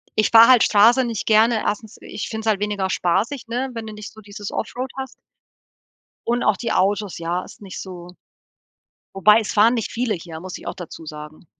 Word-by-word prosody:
ich 215 - +2
fahre 230 +1 +8
halt 250 -3 +7
Straße 235 +5 +5
nicht 230 -3 -4
gerne, 220 +1 +3
erstens 210 +1 -3
ich 210 - -6
finde 220 0 -5
es - - -4
halt 200 -2 +1
weniger 205 -2 -1
spaßig, 200 +11 -1
ne, 250 +3 -2
wenn 225 -1 -6
du 215 - -7
nicht 210 0 -9
so 220 - -14
dieses 205 0 -8
offroad 255 +3 -4
hast 265 -1 -6 1.1
und 240 +1 0
auch 200 - +3
die 235 - -3
Autos, 200 -1 0
ja, 170 +2 -2
ist - - -15
nicht 190 -2 -8
so 180 -2 -9 1.1
Wobei 210 +3 +6
es 215 - -4
fahren 225 +3 +4
nicht 225 -3 -3
viele 235 -2 -1
hier, 165 -2 -8
muss 185 0 -7
ich - - -14
auch - - -4
dazu 165 -3 -10
sagen. 150 +2 -10
210 Hz, 205 wpm, -21 LUFS, 190-230 Hz, 1.1 s, fahre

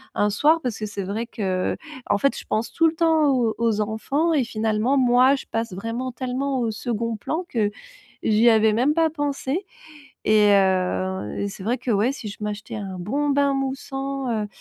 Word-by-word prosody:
un 210 - +2
soir 305 +10 +3
parce 240 -3 -3
que 215 - -3
c'est 200 -1 -5
vrai 210 +5 -3
que, 190 -6 -1 0.3
en 200 - +3
fait, 275 +5 +1
je - - -8
pense 225 +1 -1
tout 330 +5 +3
le 320 - 0
temps 320 -2 +3
aux 240 -4 +2
aux 225 -2 +1
enfants 275 +10 0
et 270 -6 +2
finalement, 220 +4 0
moi, 255 +2 +5
je - - -7
passe 225 -3 -2
vraiment 230 +6 -4
tellement 260 +2 -2
au 225 -2 0
second 230 0 -3
plan 320 - -3
que 215 -4 +1 0.6
j'y 220 +2 +4
avais 220 -1 +4
même 260 +7 +2
pas 325 -1 +3
pensé 290 +3 -2 0.6
et 210 -1 +5
heu 190 - +1
et 200 - -1
c'est 195 -1 -9
vrai 240 +5 0
que 250 - -4
ouais, 220 +4 +2
si 230 -6 -7
je 205 - -8
m'achetais 210 +2 -5
un 195 -3 -6
bon 285 +11 -1
bain 280 0 +2
moussant, 270 0 -3
heu - - -3
230 Hz, 195 wpm, -23 LUFS, 210-275 Hz, 0.6 s, moi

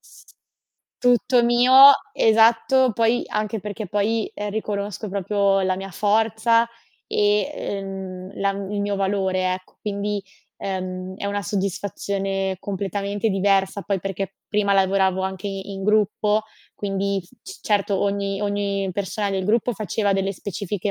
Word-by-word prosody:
s - - -18 0.7
tutto 245 0 +3
mio, 240 +2 +3 0.4
esatto, 230 +4 +4
poi 230 +2 +2
anche 215 0 -2
perché 210 +1 -5
poi, 210 +3 0
ehm, 205 0 -4
riconosco 210 0 -3
proprio 200 0 +1
la 185 0 +1
mia 195 +1 -6
forza 220 +3 +2 0.4
e, 205 -1 +2
ehm, 190 -1 -6
la 200 0 +2
il 200 +1 -4
mio 200 0 -1
valore, 190 -2 0
ecco. 185 0 -12
Quindi, 205 0 -2 0.4
ehm, 185 -1 -4
è 200 - -4
una 205 0 -2
soddisfazione 195 0 -2
completamente 200 +2 -2
diversa, 195 0 +1
poi 195 -1 -1
perché 195 0 -4
prima 205 -1 +1
lavoravo 190 -1 +2
anche 190 +1 -4
in 195 0 -6
gruppo, 210 0 +2 0.3
quindi 200 -1 -1
s 180 +8 -23
c 385 - -11
certo, 200 -2 +1
ogni 200 0 -1
ogni 200 -1 -1
persona 200 +2 -2
del 190 -1 -1
gruppo 230 +4 +1
faceva 205 0 -1
delle 195 0 0
specifiche 200 +1 -4
200 Hz, 135 wpm, -23 LUFS, 195-210 Hz, 0.7 s, esatto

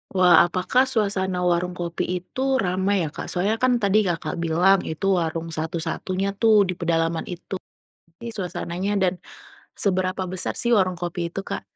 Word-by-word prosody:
Wah, 180 -2 +6
apakah 185 +9 +1
suasana 195 -6 0
warung 180 0 +1
kopi 170 -1 -3 0.2
itu 220 - -10 0.2
ramai 190 +1 +1
ya 155 - -4
Kak? - - -7
Soalnya 200 +5 0
kan 255 -1 +3
tadi 210 -2 +2
Kakak 165 -2 -2
bilang, 175 +4 +3
itu 160 +5 -4
warung 165 0 -3
satu-satunya 165 +4 -2
tuh 220 -3 +6
di 185 -1 -2
pedalaman 165 -1 0
itu, 185 +1 -6 0.6
pi 235 - -6
suasananya 185 -2 -4
dan 185 -1 +2 0.6
seberapa 185 -1 0
besar 185 0 -3
sih 240 0 +1
warung 185 -4 +2
kopi 175 -1 -3
itu 195 +3 -6
Kak? - - -4
185 Hz, 160 wpm, -23 LUFS, 170-195 Hz, 0.6 s, Wah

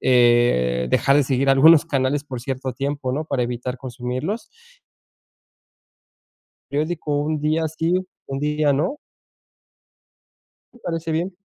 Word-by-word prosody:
eh, 120 - +3
dejar 135 - +3
de 145 - +4
seguir 135 0 0
algunos 145 +4 +7
canales, 140 0 0
por 130 -4 -6
cierto 130 +1 -4
tiempo, 140 0 -3
¿no? 155 +3 -2
Para 140 -5 -1
evitar 125 +1 -4
consumirlos. 130 - -4 2.3
¿Periódico, 150 0 -1
un 155 +1 -1
día 155 +2 0
sí, 160 +2 -1 0.3
un 135 0 -4
día 150 0 +1
no? 165 - -1 1.8
Me 245 - -18
parece 165 -4 -4
bien. 175 +4 -2
140 Hz, 120 wpm, -22 LUFS, 130-155 Hz, 2.3 s, algunos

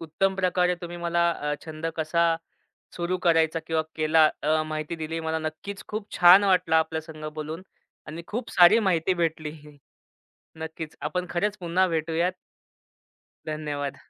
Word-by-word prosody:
उत्तम 190 +4 0
प्रकारे 180 -1 +1
तुम्ही 175 0 -7
मला 170 0 +1
अ, 150 -2 -2
छंद 160 0 -6
कसा 165 +1 +2 0.6
सुरू 175 +1 -1
करायचा? 165 -2 +2
किंवा 160 -1 +1
केला? 155 0 +4 0.2
अ, 155 +1 +2
माहिती 155 +1 -4
दिली. 160 +1 -4
मला 160 0 -2
नक्कीच 160 +6 -6
खूप 215 0 -5
छान 180 +3 +8
वाटलं 180 -4 +3
आपल्यासंगं 160 -1 -2
बोलून 155 +3 -6 0.5
आणि 165 +2 -7
खूप 230 +2 -4
सारी 180 +6 +7
माहिती 185 -3 +1
भेटली. 160 -3 -2 1.0
नक्कीच, 160 0 -7
आपण 155 +5 -2
खरंच 205 +4 -1
पुन्हा 185 +1 +1
भेटूयात. 165 +2 0 1.2
धन्यवाद. 145 -3 -4
165 Hz, 135 wpm, -26 LUFS, 155-180 Hz, 1.2 s, छान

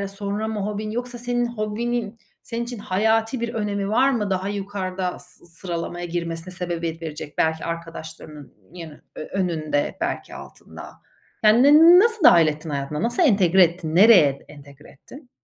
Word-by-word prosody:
sonra 205 +2 -3
mı 220 -1 -4
hobin 210 +1 -4
yoksa 245 +2 -5
senin 240 0 -1
hobinin 230 0 -3 0.3
senin 235 0 -4
için 240 0 -7
hayati 220 +5 0
bir 235 0 -3
önemi 205 -3 -2
var 250 +5 +3
mı 220 -6 -1
daha 190 0 -2
yukarıda 190 -2 -4
sı 180 -1 -12
sıralamaya 175 0 -5
girmesine 170 +1 -5
sebebiyet 170 -2 -4
verecek 155 -2 -8
belki 160 0 0
arkadaşlarının 160 -3 -8 0.2
yani 165 -3 -9 0.4
önünde 160 -6 -2
belki - - -4
altında? - - -12 0.5
Yani 220 +3 +5
ne 320 +5 +8
nasıl 450 -2 +2
dâhil 170 - +7
ettin 155 +1 -4
hayatına? 140 +2 -4
Nasıl 240 +9 +1
entegre 190 - +4
ettin? 165 -2 -2
Nereye 180 -9 +6
entegre 145 0 -15
ettin? 255 - -16
190 Hz, 150 wpm, -22 LUFS, 165-230 Hz, 0.5 s, ne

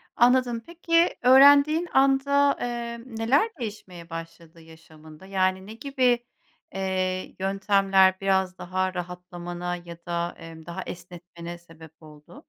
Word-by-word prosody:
Anladım, 245 -1 +3
peki 335 0 +1
öğrendiğin 285 +6 +6
anda, 275 +1 +3
eee, 235 -1 -4
neler 255 - +1
değişmeye 185 -6 -8
başladı 165 0 -10
yaşamında? 160 0 -16
Yani 190 0 0
ne 215 - -8
gibi, 250 -1 0 0.5
eee, 185 -1 -2
yöntemler 195 -1 +3
biraz 190 -1 0
daha 185 +1 -2
rahatlamana 175 0 -6
ya 175 -1 -10
da, 170 0 -3
emm, 165 -1 -12
daha 175 +2 -6
esnetmene 175 -1 -9
sebep 160 -2 -17
oldu? 155 - -15
190 Hz, 115 wpm, -25 LUFS, 175-240 Hz, 0.5 s, öğrendiğin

